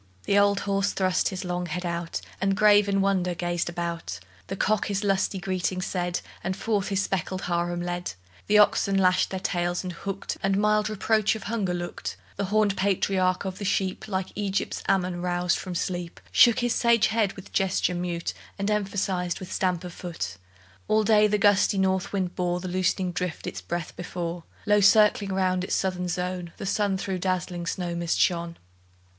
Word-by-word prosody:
The 200 - +1
old 200 0 +3
horse 195 0 0
thrust 185 -1 +1
his 190 0 -5
long 180 0 -2
head 180 +3 -4
out, 170 -1 -3 0.2
And 195 0 +1
grave 210 -1 +6
with 200 - +1
wonder 190 -2 +1
gazed 175 0 -1
about; 170 - -4 0.3
The 195 - -4
cock 215 +2 +1
his 200 0 -1
lusty 195 0 +1
greeting 185 0 -2
said, 180 -2 -2 0.2
And 185 +1 -2
forth 205 -3 0
his 195 0 0
speckled 185 0 -2
harem 175 0 -1
led; 175 0 -3 0.3
The 210 - +5
oxen 200 -1 +4
lashed 185 -1 +3
their 190 - -3
tails, 175 -1 -1
and 180 -1 -4
hooked, 195 +3 -5
And 195 0 +1
mild 210 +1 +2
reproach 215 +1 +2
of 220 - -7
hunger 200 -5 -1
looked; 175 0 -5 0.2
The 200 - -2
hornèd 205 0 +2
patriarch 190 -1 +1
of 190 -1 -4
the - - -5
sheep, 190 0 -1
Like 190 -2 -2
Egypt's 200 -1 -2
Amun 180 -2 +1
roused 175 0 0
from 185 -2 -6
sleep, 175 -1 -3
Shook 240 +1 +6
his 240 -1 +1
sage 235 -2 +4
head 220 -3 +1
with 190 - -12
gesture 190 -2 +1
mute, 175 -1 -3 0.2
And 200 +1 -1
emphasized 195 -4 -1
with 185 - -7
stamp 180 -2 0
of 180 -1 -7
foot. 170 - -5 0.5
All 215 0 +3
day 215 -1 +5
the 210 0 +1
gusty 205 -1 +4
north 190 -1 +1
wind 185 -3 -2
bore 180 -1 0
The 185 - -5
loosening 185 0 0
drift 180 -2 -3
its - - -5
breath 170 -2 -4
before; 175 -1 -5 0.2
Low 210 -1 +4
circling 205 -1 +5
round 185 -1 +1
its - - -1
southern 185 -1 -1
zone, 180 -1 -3
The - - -6
sun 200 0 +1
through 190 -1 -3
dazzling 180 -2 -2
snow 175 0 -2
mist 170 -1 -1
shone. 170 -2 +1
185 Hz, 185 wpm, -26 LUFS, 175-200 Hz, 0.5 s, grave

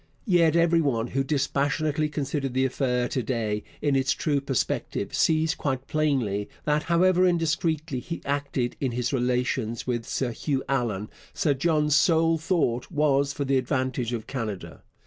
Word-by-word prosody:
Yet 170 -6 +4
every 170 0 +4
one 120 -7 0
who 135 +1 0
dispassionately 145 +2 0
considers 140 -2 -2
the 130 +1 +2
affair 125 -2 0
to 130 - -1
day 110 -3 -2 0.2
in 145 -2 +2
its 135 -1 +2
true 145 -3 0
perspective 135 -3 -2
sees 160 0 +2
quite 135 -6 -3
plainly 130 -10 0 0.2
that, 150 0 +2
however 180 +2 +3
indiscreetly 160 -4 0
he 170 +5 -6
acted 140 -3 -1
in 130 -4 -1
his 125 +2 -1
relations 125 -2 -1
with 120 -2 -2
Sir 130 -3 -1
Hugh 135 +3 -2
Allan, 115 -6 -1 0.2
Sir 145 - +2
John's 150 +1 +2
sole 165 +1 +3
thought 155 -8 0
was 145 -3 +2
for 140 - -3
the 135 0 +2
advantage 130 -2 -1
of 115 -3 -3
Canada. 110 -8 -5
140 Hz, 155 wpm, -26 LUFS, 125-155 Hz, 0.2 s, Yet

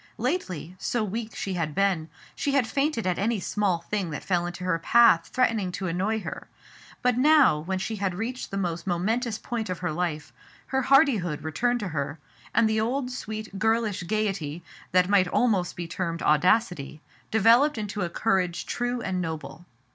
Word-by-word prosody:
Lately, 195 - -3
so 235 +3 -1
weak 220 +2 -4
she 195 - -3
had 160 -4 -2
been, 190 -5 +1 0.2
she 280 - -2
had 275 -4 +3
fainted 275 -2 -1
at 180 -1 0
any 220 +2 +1
small 190 -2 0
thing 200 -5 -1
that 150 - -5
fell 175 -2 0
into 175 +1 -7
her 180 -2 0
path 225 -3 +5
threatening 225 -7 +1
to 190 - -4
annoy 190 +6 0
her; - - -7 0.6
but 250 -1 +2
now, 290 - +5
when 185 +5 -3
she 215 +4 -3
had 190 -2 -1
reached 240 +6 -4
the 195 - -4
most 175 -2 -3
momentous 215 +6 0
point 225 -4 -4
of 180 - -2
her 180 -1 -2
life, 155 -2 -3 0.3
her 265 0 0
hardihood 235 - +3
returned 240 +10 0
to 200 - -3
her, 140 -1 -3 0.3
and 230 - +3
the 220 0 +1
old, 250 +3 -1
sweet, 215 -4 -6
girlish 220 -2 +1
gayety, 195 -7 -2 0.3
that 180 0 +4
might 195 -2 +4
almost 195 -3 +1
be 175 -1 -5
termed 170 -1 -3
audacity, 165 -1 +2 0.3
developed 230 +7 +4
into 210 -1 -4
a 175 - -1
courage 185 -3 0
true 245 0 -2
and 185 -4 -2
noble. 165 +1 -6
195 Hz, 175 wpm, -26 LUFS, 175-230 Hz, 0.6 s, path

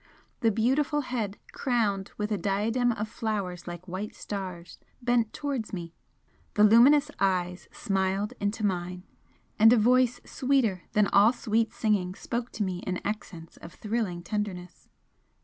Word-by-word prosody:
The 230 - +3
beautiful 270 +8 +1
head, 230 -6 -3
crowned 215 -7 0
with 210 0 -2
a 210 - +1
diadem 220 +6 +1
of 220 -1 -3
flowers 200 -6 -3
like 175 +1 -7
white 190 +4 -5
stars, 185 -4 -6 0.2
bent 240 -3 +1
towards 275 -8 -4
me 170 -3 -5 0.6
the 210 - +5
luminous 240 +7 +6
eyes 180 -2 0
smiled 195 +1 -1
into 210 +2 -1
mine, 180 -1 -2 0.6
and 220 +1 +8
a 245 - +6
voice 250 +2 +3
sweeter 250 - 0
than 210 -1 +4
all 205 +3 +6
sweet 225 -2 0
singing 210 -6 0
spoke 235 +3 -4
to 215 - -1
me 185 -2 -3
in 180 0 -3
accents 180 -6 -6
of 170 - -12
thrilling 210 -6 -2
tenderness. 180 -2 -5
210 Hz, 145 wpm, -28 LUFS, 185-235 Hz, 0.6 s, and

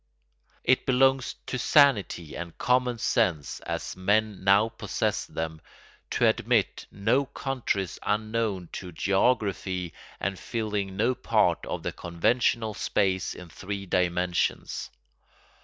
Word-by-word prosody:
It 130 +1 +2
belongs 135 0 +3
to 130 - -3
sanity 105 - +3
and 85 -1 -7
common 125 -1 +2
sense, 80 -9 0
as - - -4
men 105 +2 +1
now 100 +3 +5
possess - - -2
them, 80 -1 -5 0.5
to - - +2
admit - - +1
no 130 +7 +1
countries 125 -10 -2
unknown 110 -4 -1
to 90 -2 -7
geography 95 -2 0 0.3
and 100 -2 -2
filling 105 -4 -3
no 115 +5 +2
part - - +2
of - - -4
the - - -2
conventional 110 +6 0
space 95 -3 0
in 90 -1 -10
three 100 +3 -6
dimensions. 90 -1 0
100 Hz, 115 wpm, -27 LUFS, 90-120 Hz, 0.5 s, now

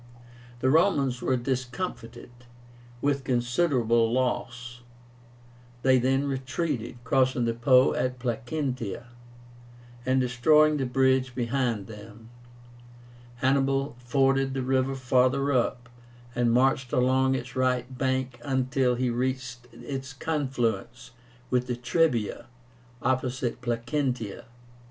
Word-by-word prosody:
The 130 - +3
Romans 140 -7 +2
were 130 - +1
discomfited, 125 -1 -4 0.7
with 140 -1 +1
considerable 120 -2 +1
loss. 125 -1 -2 1.0
They 130 -1 +5
then 135 +3 +1
retreated, 135 -2 -3
crossing 130 0 +2
the 115 - 0
Po 125 +2 +4
at 125 0 -1
Placentia, 125 -1 -3 1.0
and 130 +1 +2
destroying 150 +5 +4
the 135 -2 -1
bridge 130 0 +2
behind 120 -4 -1
them. 110 +2 -12 1.2
Hannibal 135 0 +1
forded 135 +1 +1
the 135 - -1
river 130 +1 +1
farther 130 +2 +2
up, 125 -2 0 0.5
and 120 -1 +1
marched 130 +1 +2
along 130 +1 +2
its 130 +1 -6
right 130 0 0
bank 130 -1 -1
until 130 -1 +1
he 125 0 0
reached 125 0 -3
its 135 +3 -7
confluence 130 -5 -2 0.4
with 125 0 +1
the 125 - -1
Trebia, 120 -1 0 0.6
opposite 125 -1 -1
Placentia. 120 -2 -2
130 Hz, 105 wpm, -27 LUFS, 120-135 Hz, 1.2 s, They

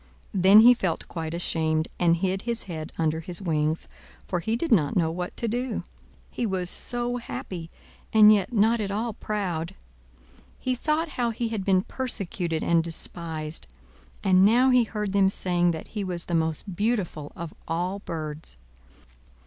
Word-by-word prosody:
Then 195 +3 +7
he 245 +2 +9
felt 185 -9 -2
quite 160 -1 -4
ashamed, 160 -2 0
and 170 -1 +4
hid 190 +2 -1
his 235 -1 -2
head 160 -4 -6
under 160 -1 +1
his 170 +1 0
wings, 155 -3 -1 0.4
for 180 - -1
he 220 +6 -1
did 290 +6 -2
not 155 -10 +3
know 165 -3 +2
what 180 +1 -5
to 235 - -2
do; 245 +1 -2 0.5
he - - -3
was 185 -5 -1
so 245 0 -2
happy, 180 -7 -6 0.4
and 215 -1 +8
yet 200 +1 +1
not 225 +1 +3
at 200 - -2
all 220 +3 -2
proud. 185 -7 -3 0.8
He 255 - -1
thought 305 +6 0
how 240 -1 +2
he 230 0 -2
had 220 -4 -3
been 190 -1 +3
persecuted 185 -11 -3
and 170 -1 +3
despised; 160 - -4 0.6
and 185 -1 +5
now 245 +6 +5
he 250 -2 +5
heard 210 -2 -3
them 195 -1 +4
saying 175 -2 +1
that 160 -2 -4
he 210 -2 -3
was 175 -2 -4
the 175 - -4
most 160 +3 -1
beautiful 200 -8 -1
of 170 -3 -6
all 180 +4 -1
birds. 155 - -6
185 Hz, 165 wpm, -26 LUFS, 165-220 Hz, 0.8 s, he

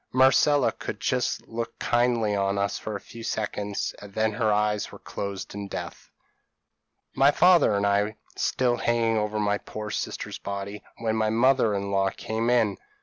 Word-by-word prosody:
Marcella 130 +2 +4
could - - -6
just - - -1
look 115 0 -5
kindly 120 -3 +1
on 100 0 0
us 100 0 -1
for 110 - -5
a - - -3
few 115 - -12
seconds, 105 -2 -3
and 105 - -10
then 110 0 +2
her 110 0 +1
eyes 105 0 0
were - - -10
closed 100 -1 -6
in 100 0 -5
death. - - -7 1.0
"My 135 +1 +5
father 170 - +5
and 100 0 +1
I 100 0 +3
were 105 +1 -3 0.2
still 125 -2 +1
hanging 115 -2 +1
over 105 0 -1
my 105 0 +1
poor 105 -1 -7
sister's - - -4
body, 100 +1 -5 0.2
when 110 -1 -1
my 110 -1 +1
mother 115 -1 +3
in 100 0 -3
law 95 0 +2
came 110 +4 -2
in. 115 -5 +2
110 Hz, 175 wpm, -26 LUFS, 100-115 Hz, 1.0 s, My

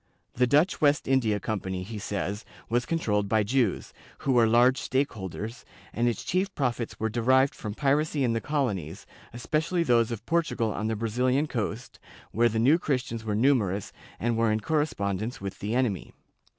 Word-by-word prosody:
The 125 +1 +2
Dutch 150 +8 +2
West 145 -1 +3
India 120 -6 +2
Company, 95 -3 -3
he 105 +2 -7
says, 100 0 -3 0.3
was 120 +1 0
controlled 105 -11 0
by 110 0 +3
Jews, 115 -2 0 0.3
who 135 - 0
were 120 -3 +5
large 120 +3 +4
stockholders, 115 -3 -3 0.3
and 120 +1 +1
its 120 -4 -1
chief 190 +2 0
profits 125 -4 -2
were 110 - 0
derived 130 +4 +3
from 105 -1 -6
piracy 145 +1 +1
in 120 -2 +1
the 115 - -1
colonies, 105 - -2 0.3
especially 160 +8 -1
those 120 -6 +3
of 115 -2 -6
Portugal 160 -10 0
on 110 - -2
the 110 - -1
Brazilian 125 +6 +1
coast, 120 -3 -4 0.3
where 120 +2 +3
the 110 - -2
New 135 +9 +4
Christians 125 -7 -2
were 105 -2 -2
numerous 105 -6 +1 0.3
and 120 0 0
were 115 -1 +2
in 110 0 0
correspondence 110 -7 -1
with 100 -1 -6
the 105 +4 -2
enemy. 115 -9 -1
120 Hz, 170 wpm, -27 LUFS, 105-135 Hz, 0.3 s, were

